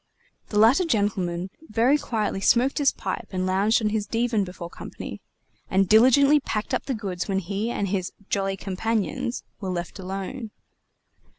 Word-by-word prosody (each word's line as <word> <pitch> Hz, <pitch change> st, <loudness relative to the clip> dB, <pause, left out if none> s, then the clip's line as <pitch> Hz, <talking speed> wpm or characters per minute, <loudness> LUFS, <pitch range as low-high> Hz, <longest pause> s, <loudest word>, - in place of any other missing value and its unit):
The 210 Hz, -, -2 dB
latter 230 Hz, -, +6 dB
gentleman 190 Hz, -, -1 dB, 0.2 s
very 235 Hz, +6 st, +3 dB
quietly 215 Hz, -6 st, -2 dB
smoked 250 Hz, +8 st, +3 dB
his 280 Hz, -2 st, +4 dB
pipe 225 Hz, -, -4 dB
and 185 Hz, -1 st, -1 dB
lounged 200 Hz, +5 st, +2 dB
on 210 Hz, -, +2 dB
his 210 Hz, -1 st, -1 dB
divan 230 Hz, -2 st, +1 dB
before 180 Hz, -2 st, -7 dB
company, -, -, -8 dB, 0.5 s
and 190 Hz, 0 st, +3 dB
diligently 260 Hz, +8 st, +6 dB
packed 215 Hz, -6 st, -3 dB
up -, -, -1 dB
the 265 Hz, -, 0 dB
goods 190 Hz, -4 st, -4 dB
when 195 Hz, -2 st, 0 dB
he 200 Hz, +4 st, -2 dB
and 205 Hz, -4 st, -1 dB
his 185 Hz, -1 st, -2 dB, 0.2 s
"jolly 195 Hz, -1 st, -1 dB
companions" 210 Hz, +3 st, -2 dB, 0.2 s
were 195 Hz, -, -4 dB
left 175 Hz, +2 st, -4 dB
alone. 195 Hz, +6 st, -5 dB
210 Hz, 160 wpm, -25 LUFS, 190-230 Hz, 0.5 s, latter